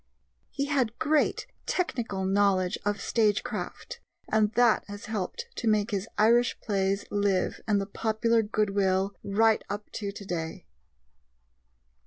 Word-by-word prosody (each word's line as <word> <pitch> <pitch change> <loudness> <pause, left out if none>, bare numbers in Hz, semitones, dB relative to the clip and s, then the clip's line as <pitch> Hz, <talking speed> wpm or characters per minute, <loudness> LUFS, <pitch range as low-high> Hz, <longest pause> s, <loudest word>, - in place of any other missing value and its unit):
He 280 - -2
had 260 -6 0
great 300 +1 +1 0.2
technical 230 - -1
knowledge 195 -1 +2
of 205 0 0
stagecraft, 215 -3 -1 0.3
and 215 -1 +2
that 240 -3 +4
has 205 0 -8
helped 220 - -3
to 235 - -2
make 215 0 +2
his 200 0 -2
Irish 235 +3 +4
plays 195 -1 0
live 200 -2 0
in 210 -2 +3
the 200 - -1
popular 225 +2 +1
goodwill 200 -2 +1
right 220 +2 +3
up 205 +1 -5
to 200 -2 -4
today. 175 - -5
205 Hz, 125 wpm, -28 LUFS, 195-225 Hz, 0.3 s, that